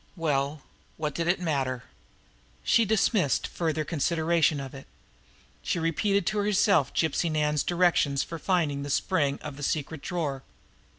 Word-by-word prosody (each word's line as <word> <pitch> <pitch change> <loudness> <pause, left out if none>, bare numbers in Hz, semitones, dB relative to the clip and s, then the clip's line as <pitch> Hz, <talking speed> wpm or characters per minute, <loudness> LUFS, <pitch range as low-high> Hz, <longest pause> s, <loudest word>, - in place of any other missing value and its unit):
Well, 145 -3 -1 0.3
what 150 -2 -2
did 170 +2 -2
it 175 +1 +2
matter? 135 -7 -1 0.8
She 230 - +4
dismissed 205 - +2
further 160 -2 -2
consideration 165 -1 +1
of 135 -1 -7
it. 135 -1 -10 0.7
She - - -1
repeated 175 +4 +1
to 210 - 0
herself 200 - +3
Gypsy 165 +1 0
Nan's 150 -1 +1
directions 170 -6 +2
for 165 - -7
finding 155 -6 0
the 145 - -5
spring 145 -2 +1
of 145 -2 -7
the - - -9
secret 150 +1 -2
drawer. 150 -7 -3
160 Hz, 140 wpm, -27 LUFS, 140-175 Hz, 0.8 s, She